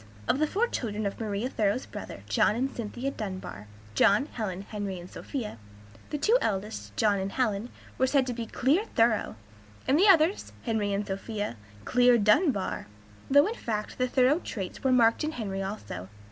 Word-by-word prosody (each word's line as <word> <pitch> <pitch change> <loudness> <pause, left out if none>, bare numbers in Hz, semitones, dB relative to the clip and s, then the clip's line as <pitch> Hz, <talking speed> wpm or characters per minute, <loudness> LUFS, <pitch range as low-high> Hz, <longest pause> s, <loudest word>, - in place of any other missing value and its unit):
Of 265 - +2
the 310 - +3
four 415 +9 +1
children 215 - -3
of 200 - -3
Maria 215 +1 -2
Thoreau's 220 -1 0
brother 205 - -8
John 105 - +3
and 265 +3 -1
Cynthia 240 +4 -3
Dunbar, 185 - -6 0.3
John, 200 - +4
Helen, 200 - -4
Henry, 200 -3 -5
and 175 - -9
Sophia, 220 - -6 0.5
the 300 - -2
two 450 - +3
eldest, 210 +1 -3
John 205 -3 +3
and 190 +1 -3
Helen, 220 -2 0 0.3
were 260 - +4
said 270 -1 +3
to 250 - -2
be 230 -1 -5
"clear 285 - +2
Thoreau," 225 - +2 0.5
and 280 +4 +4
the 400 - +6
others, 350 0 +4
Henry 220 -4 0
and 200 +1 -1
Sophia, 205 - -4 0.3
"clear 245 0 +5
Dunbar;" 215 - +2 0.4
though 285 +2 +6
in 435 - -1
fact 215 - -4
the 255 - +2
Thoreau 260 +5 +3
traits 195 - -6
were 265 - +3
marked 235 +1 +4
in 310 +1 -2
Henry 195 -6 -3
also. 190 - -6
225 Hz, 175 wpm, -28 LUFS, 200-265 Hz, 0.5 s, the